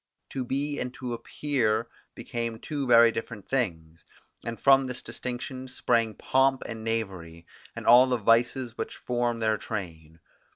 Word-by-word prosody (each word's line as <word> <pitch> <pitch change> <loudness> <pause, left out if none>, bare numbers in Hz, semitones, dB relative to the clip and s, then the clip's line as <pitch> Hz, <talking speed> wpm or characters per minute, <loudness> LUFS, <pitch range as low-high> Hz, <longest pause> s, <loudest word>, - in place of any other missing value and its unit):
To 130 - -2
be 145 +3 -2
and 125 - -3
to 125 -2 -5
appear 115 -3 -1 0.3
became 115 -1 -4
two 140 +2 -4
very 115 -1 +7
different 115 -3 -6
things, 85 -10 -2 0.4
and 115 0 -5
from 135 -1 +5
this 125 -1 -5
distinction 130 +1 -5
sprang 115 -3 0
pomp 135 0 +2
and 110 -1 -6
knavery, 95 -7 -4 0.3
and - - -7
all 125 +2 +8
the 125 -1 +1
vices 120 +2 +2
which - - -4
form 120 -1 -1
their 110 -1 +2
train. 80 -6 -6
120 Hz, 150 wpm, -27 LUFS, 110-130 Hz, 0.4 s, all